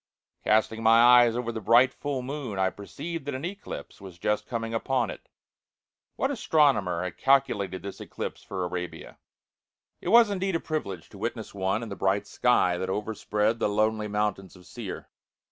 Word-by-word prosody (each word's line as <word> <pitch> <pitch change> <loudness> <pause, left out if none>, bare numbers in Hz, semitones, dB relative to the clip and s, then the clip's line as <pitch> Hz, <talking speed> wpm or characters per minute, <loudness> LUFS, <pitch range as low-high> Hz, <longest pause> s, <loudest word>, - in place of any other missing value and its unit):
Casting 110 +1 +2
my 115 +1 +6
eyes 120 -1 +7
over 120 -1 -2
the 110 -1 -5
bright, 120 +5 +5
full 140 -3 -3
moon, 130 -6 -5
I 95 0 +2
perceived 165 +9 -7
that 145 - -2
an 135 +5 -4
eclipse 195 - -7
was 95 -3 -10
just 105 +4 -1
coming 115 -1 -3
upon 120 -1 0
it. - - -12 0.9
What - - 0
astronomer 105 - +2
had 90 -2 -5
calculated 105 -9 +1
this 100 - -7
eclipse - - -6
for 95 -2 -4
Arabia? 90 0 -6 0.8
It - - -7
was 230 -2 +7
indeed 190 -2 -1
a - - +1
privilege 100 - -4
to - - -13
witness - - -4
one 95 +3 -1
in 115 - -6
the 100 - -5
bright 100 +1 +1
sky 100 -6 +2
that 95 - -3
over 105 +3 -2
spread 105 +2 0
the - - +1
lonely 110 +1 +1
mountains 105 -2 -2
of 90 -1 -16
Seir. - - -7
110 Hz, 180 wpm, -27 LUFS, 95-130 Hz, 0.9 s, eyes